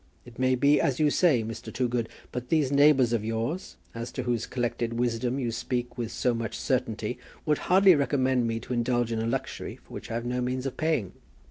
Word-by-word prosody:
"It 120 0 -13
may 130 0 +3
be 140 +3 +4
as 135 -2 0
you 150 -1 +4
say, 145 -11 +3
Mr. 110 +1 -6
Toogood. 120 -1 -1 0.2
But 125 0 -5
these 150 -5 +2
neighbours 140 -4 +5
of 115 -3 0
yours, 115 - -3 0.2
as 115 +1 -5
to 130 - -3
whose 120 -2 -1
collected 120 -1 -2
wisdom 120 +1 0
you 120 -4 -1
speak 120 +1 -3
with 120 -2 -4
so 120 +1 +1
much 115 -1 -3
certainty, - - -1 0.3
would 150 -1 +2
hardly 190 +1 +7
recommend 130 -4 +2
me 115 0 -1
to - - -5
indulge 120 -1 +1
in 115 - -1
a 115 - -1
luxury 115 - -3
for - - -18
which - - -7
I 115 - -3
have 115 +1 -3
no 125 +1 -1
means 125 +1 -2
of 135 - -3
paying." 155 - 0
125 Hz, 215 wpm, -27 LUFS, 115-135 Hz, 0.3 s, hardly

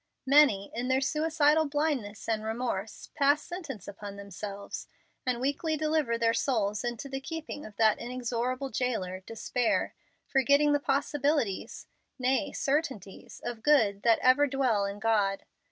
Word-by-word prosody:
Many, 270 -8 +5
in 240 +2 -3
their 260 0 +3
suicidal 310 +1 +2
blindness 285 -8 -2
and 220 -1 0
remorse, 220 -2 -4
pass 290 -1 +3
sentence 310 - -7
upon 200 0 -8
themselves, 200 0 -7 0.4
and 250 -2 +1
weakly 285 +4 -1
deliver 305 -6 +1
their 230 0 +2
souls 210 -6 0
into 240 +2 -4
the 270 0 -4
keeping 310 0 -6
of 210 - -14
that 220 0 +3
inexorable 250 +2 -3
jailer, 195 -8 -2
Despair, 225 +4 -1 0.3
forgetting 280 +2 +3
the 290 - +3
possibilities 280 -5 -1 0.3
nay, 265 +3 +1
certainties 270 - -3
of 235 -2 -4
good 220 -9 +3
that 230 0 +4
ever 260 +3 +5
dwell 255 -7 +1
in 200 +1 -4
God. 205 -3 +1
250 Hz, 135 wpm, -29 LUFS, 215-290 Hz, 0.4 s, Many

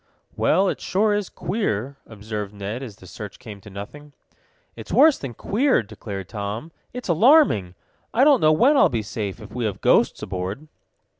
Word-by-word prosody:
"Well, 195 +1 +2
it - - -2
sure 210 +2 +1
is 205 -2 -2
queer," 140 - -3
observed 105 -1 -6
Ned, 100 +5 -5
as 120 -7 -8
the 95 - -16
search 105 +2 -9
came 105 -5 -11
to 105 - -12
nothing. 140 +10 -10 0.6
"It's - - -10
worse 310 -2 +5
than 125 -4 -7
queer," 255 - +1
declared 100 -3 -8
Tom, 105 - -5 0.2
"it's 250 +1 -7
alarming! 175 - +4 0.4
I 250 - +3
don't 280 -4 +5
know 155 - +5
when 250 - +4
I'll - - +5
be 115 -3 -2
safe 105 -1 -5
if 105 -1 -12
we 125 -1 -2
have 105 -3 -3
ghosts - - +2
aboard." 95 +10 -5
115 Hz, 175 wpm, -23 LUFS, -, 0.6 s, worse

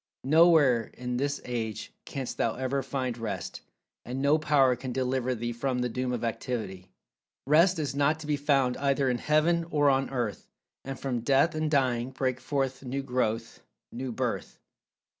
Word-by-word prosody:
"Nowhere 150 -5 +5
in 125 0 -3
this 140 +2 -1
age 115 -4 -4
canst 135 -3 -5
thou 115 - 0
ever 130 +2 -1
find 130 -2 -3
rest, 100 -7 -5 0.4
and 125 +2 -5
no 145 +3 +3
power 140 -4 +3
can 130 +1 -6
deliver 130 0 -1
thee 120 +1 -3
from 125 +2 -2
the 125 0 0
doom 125 +2 -2
of 120 -2 -3
Activity. 110 -5 -4 0.6
"Rest 165 +6 +4
is 145 -5 -2
not 145 +3 +2
to - - -8
be 150 0 +1
found 140 -3 +1
either 140 -1 +1
in 120 - -2
heaven 160 +4 +2
or 145 -3 +3
on 135 0 +1
earth, 120 -6 -3 0.4
and 135 0 -6
from 130 -3 -2
death 135 +7 +3
and 155 0 -1
dying 130 -4 +1
break 130 -1 -2
forth 135 0 -2
new 135 +2 -3
growth,—new 125 0 -4
birth. - - -3
130 Hz, 165 wpm, -28 LUFS, 125-140 Hz, 0.6 s, Nowhere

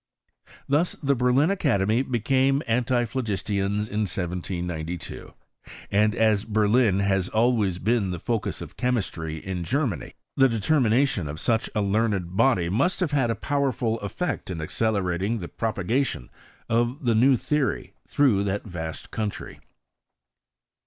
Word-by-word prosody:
Thus 150 +6 +2
the 140 0 +3
Berlin 130 +6 +3
Academy 120 - +1
became 135 +3 +1
anttphlo 120 +1 0
gistians 100 -1 -1
in 105 - -3
1792: 90 -2 -4 0.6
and 105 +2 +3
as 110 -3 +3
Berlin 110 -1 +2
has 95 -2 +1
always 110 -5 +2
been 110 0 +1
the 90 - -3
focus 115 +3 -2
of - - -12
chemistry 95 -11 -2
in 90 +2 -4
Germany, 125 - -2 0.2
the 135 -1 +5
determinatioa 115 - +2
of 75 +2 -6
such 115 +2 0
a 105 - +2
learned 100 -3 0
body 110 -6 +3
must 130 - +1
have 180 -5 0
had 135 -5 +2
a 115 - 0
powerful 130 -6 -1
effect 105 - -3
in 90 -3 -4
accelerating 100 +3 -1
the 90 -5 -6
propagation 110 - -2 0.4
of 120 +4 0
the 120 - +3
new 130 +5 +5
theory 145 -1 -1
through 120 -9 +3
that 100 +1 -2
vast 80 -5 -6
country. 105 -2 -4
110 Hz, 130 wpm, -25 LUFS, 95-125 Hz, 0.6 s, the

